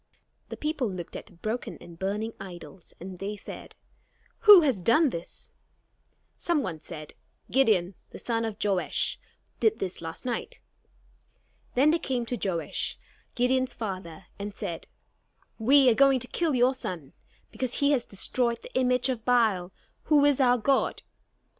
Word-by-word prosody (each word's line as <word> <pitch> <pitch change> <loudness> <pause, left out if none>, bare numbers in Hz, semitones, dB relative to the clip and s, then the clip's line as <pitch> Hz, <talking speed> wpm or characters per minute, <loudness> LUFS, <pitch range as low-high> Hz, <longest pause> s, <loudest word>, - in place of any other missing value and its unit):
The - - -7
people 300 -6 -1
looked 180 -3 -7
at - - -7
the 210 - -18
broken 215 +8 -4
and 170 -1 -13
burning 210 +4 -2
idols; 180 -1 -11
and 185 0 -9
they 205 +2 -4
said: 205 - -10 0.6
"Who 415 -4 +9
has 270 - +1
done 240 - +3
this?" 170 -3 -8 0.9
Some 330 -5 0
one 165 -7 -5
said: 155 -3 -9 0.4
"Gideon, 210 -9 +3 0.2
the - - -10
son 230 -1 -2
of 220 -2 -4
Joash, 195 -3 0 0.4
did 440 0 +3
this 185 -3 -4
last 165 +5 -7
night." 245 - -4 1.2
Then 280 +5 +5
they 335 - +1
came 255 -6 -2
to 245 - -3
Joash, 185 -6 -2 0.4
Gideon's 255 +1 +1
father, 185 -5 -6
and 205 0 -6
said: 165 -2 -5 0.7
"We 265 +4 +6
are - - +4
going 270 +2 +4
to 250 - -1
kill 320 0 0
your 250 +1 +4
son 175 - -6 0.4
because 255 -2 -2
he 280 0 +2
has 255 -5 +1
destroyed 235 +4 0
the - - -11
image 250 -1 +2
of 250 -4 -3
Baal, 220 -7 +2 0.3
who 295 -2 +4
is 285 -2 +3
our 250 -1 +4
god." 270 +4 +1
230 Hz, 155 wpm, -27 LUFS, 190-260 Hz, 1.2 s, Who